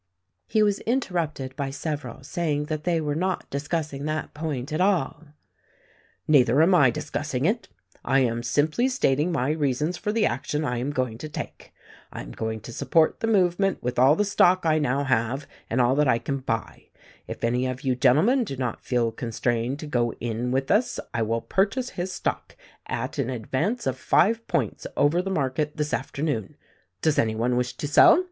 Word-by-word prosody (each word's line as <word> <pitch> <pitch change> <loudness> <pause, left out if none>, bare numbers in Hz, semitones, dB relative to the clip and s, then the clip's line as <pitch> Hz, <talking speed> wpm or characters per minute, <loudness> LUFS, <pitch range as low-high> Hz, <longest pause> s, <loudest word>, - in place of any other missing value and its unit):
He 215 - +3
was 205 -1 +2
interrupted 170 - -2
by 140 -1 -2
several 140 -3 -5
saying 150 0 -1
that 155 +1 -4
they 170 -2 +2
were 150 -2 -1
not 185 +4 -1
discussing 145 0 -3
that 155 +1 -3
point 150 -2 -4
at 155 - 0
all. 180 -5 +1 1.0
"Neither 135 -3 +5
am 180 +3 +4
I 145 -8 +6
discussing 135 +3 -3
it. 225 +6 0 0.4
I 135 0 +3
am 120 -2 0
simply 150 - +1
stating 165 - +1
my 140 -3 0
reasons 150 +3 0
for 210 - -2
the 220 0 +2
action 150 +5 -1
I 120 -3 -1
am 130 +4 -2
going 130 -5 -2
to 155 - -6
take. - - -7 0.4
I - - -6
am - - -10
going 110 -1 -4
to 120 - -9
support 160 +5 +2
the 225 - -1
movement 195 -2 +2
with 125 0 -1
all 135 +4 +6
the 210 - +1
stock 185 -3 +3
I 155 -1 +3
now 140 -1 0
have 130 +1 0 0.2
and 120 - 0
all 125 +1 +4
that 150 -1 +3
I 120 - +4
can 135 +4 -3
buy. 115 -4 -4 0.4
If - - -7
any 125 +2 +1
of 130 0 -4
you 130 -3 0
gentlemen 155 - +4
do 135 - -6
not 125 -3 -3
feel 120 -2 +1
con 115 +1 -6
strained 120 +3 -1
to - - -5
go 120 -5 0
in 120 +1 -3
with 135 +1 0
us 215 +5 +2
I 115 - 0
will 115 +1 0
purchase 215 - 0
his 180 +1 -4
stock - - -3 0.3
at 130 +5 -4
an 130 -2 0
advance 130 - -2
of 130 -1 -1
five 230 +5 +2
points 140 - -1
over 145 +6 +3
the 195 - -4
market 150 -3 -1
this 150 -1 -2
afternoon. 135 -3 -2 0.5
Does 155 -2 +3
any 110 -1 +1
one 120 +3 0
wish 125 0 -1
to 145 - -3
sell 150 - +7
145 Hz, 195 wpm, -25 LUFS, 125-170 Hz, 1.0 s, sell